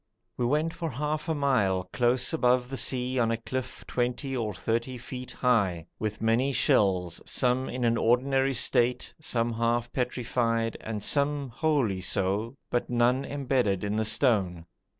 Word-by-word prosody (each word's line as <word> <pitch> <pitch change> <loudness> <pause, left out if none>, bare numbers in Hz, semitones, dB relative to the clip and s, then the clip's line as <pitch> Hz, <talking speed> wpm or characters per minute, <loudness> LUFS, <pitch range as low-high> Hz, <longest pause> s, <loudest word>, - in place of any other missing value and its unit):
We 120 - 0
went 155 +5 +1
for 165 -1 -4
half 150 +4 -3
a 160 - +1
mile 105 -11 +1
close 125 +3 +2
above 125 -4 +2
the - - -2
sea 130 -1 0
on 115 -2 +2
a 115 - 0
cliff 130 +2 -5
20 125 +2 -2
or 115 -4 -1
30 115 +5 -2
feet 125 +1 -8
high, 100 -10 +1
with 110 0 -3
many 115 +5 +2
shells, 95 - +2
some 130 0 0
in 125 0 -3
an 115 0 +2
ordinary 135 +3 +2
state, 120 0 +1
some 120 -6 0
half 115 +1 0
petrified, 115 -2 -1
and 110 -2 -5
some 140 0 +1
wholly 120 - 0
so, 100 +6 0 0.2
but 120 - -1
none 125 +2 +2
embedded 130 -9 0
in 105 +1 -1
the 110 - +1
stone. 95 -9 +1
120 Hz, 155 wpm, -28 LUFS, 110-130 Hz, 0.2 s, close